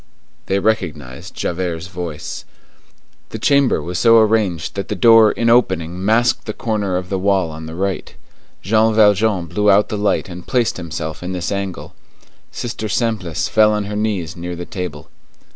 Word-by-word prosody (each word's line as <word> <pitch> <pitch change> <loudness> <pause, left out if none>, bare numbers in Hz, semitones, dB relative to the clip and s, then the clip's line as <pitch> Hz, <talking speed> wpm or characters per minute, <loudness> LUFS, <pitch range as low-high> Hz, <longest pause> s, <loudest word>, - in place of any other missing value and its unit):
They 95 - +1
recognized 80 - -2
Javert's 85 -2 -3
voice. 85 -4 -6 0.9
The - - -6
chamber 140 - +2
was 90 +2 -3
so 115 -1 +6
arranged 105 -7 +1
that 100 - -4
the 105 - -3
door 115 +2 +6
in 115 - -1
opening 95 -7 +2
masked 115 +3 +2
the 110 - -4
corner 105 -6 -1
of 90 0 -5
the 95 - -1
wall 95 -3 +1
on 80 +1 -8
the 80 - -7
right. 95 +1 -3 0.5
Jean 110 +2 +2
Valjean 105 -3 +3
blew 105 +4 0
out 100 +1 +4
the 105 -3 -3
light 105 -2 0
and 90 -1 -10
placed 125 -3 +1
himself 80 -2 -5
in 90 +1 -4
this 90 -2 -3
angle. 100 -2 -4 0.6
Sister 115 -2 -5
Simplice 95 -9 -1
fell 105 -1 +4
on 105 -1 -1
her 105 +1 -5
knees 100 -7 -2
near 90 0 -5
the 85 +1 -6
table. 90 -7 -7
95 Hz, 170 wpm, -18 LUFS, 85-110 Hz, 0.9 s, so